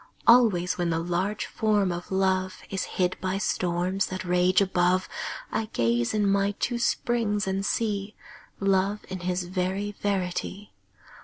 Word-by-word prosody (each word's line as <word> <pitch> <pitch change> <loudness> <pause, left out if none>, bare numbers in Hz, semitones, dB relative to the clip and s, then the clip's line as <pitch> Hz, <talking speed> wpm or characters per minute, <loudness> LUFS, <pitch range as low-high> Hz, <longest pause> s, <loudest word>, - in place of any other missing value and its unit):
Always 215 -8 +5
when 175 -1 +1
the 165 - +1
large 175 +5 -1
Form 210 -4 +1
of 175 +2 -6
Love 190 -1 0
Is 195 -1 -1
hid 180 -1 0
by 190 +1 -1
storms 185 0 0
that 185 0 -5
rage 180 +1 +3
above, 185 -1 +2 0.4
I 220 - -1
gaze 120 - +1
in 210 -1 +2
my 200 +1 +2
two 240 +4 -2
springs 230 -4 0
and 190 +1 -1
see 205 -1 -1 0.4
Love 195 +1 +1
in 185 0 -4
his 180 0 -1
very 190 +3 -2
verity. 200 0 -3
190 Hz, 145 wpm, -26 LUFS, 180-205 Hz, 0.4 s, Always